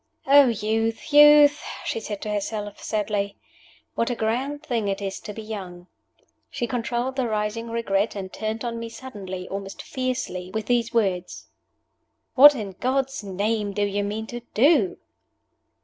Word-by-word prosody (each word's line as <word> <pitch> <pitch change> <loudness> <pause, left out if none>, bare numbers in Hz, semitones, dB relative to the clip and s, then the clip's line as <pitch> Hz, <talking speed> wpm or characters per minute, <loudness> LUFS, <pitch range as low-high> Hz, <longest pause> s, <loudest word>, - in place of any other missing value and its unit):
"Oh, 280 0 +7
youth, 225 +4 -1
youth!" 295 0 +8 0.2
she - - -2
said 210 -2 -6
to 210 - -3
herself, 205 0 -4
sadly. 205 -2 -2 0.6
"What 230 - 0
a 245 - -1
grand 255 +7 -2
thing 230 -4 -1
it 195 -1 -1
is 195 -1 -4
to - - -8
be 220 +1 -8
young!" 185 -5 -7 0.6
She 240 - -3
controlled 240 +2 -2
the 260 -2 +1
rising 215 +1 -2
regret, 220 -3 0
and 190 -2 -6
turned 220 +2 -3
on 230 -1 -3
me 230 0 -5
suddenly, 195 -7 -8
almost 195 0 -6
fiercely, 255 -8 -3
with 220 -1 -2
these 235 -1 +1
words: 190 -6 -1 0.8
"What, 290 +2 +9
in 210 -5 -5
God's 270 -1 -1
name, 205 +2 -1
do 205 +1 0
you 205 0 -1
mean 210 +2 -3
to 240 +2 -6 0.2
do?" 330 - +4
220 Hz, 155 wpm, -24 LUFS, 205-245 Hz, 0.8 s, What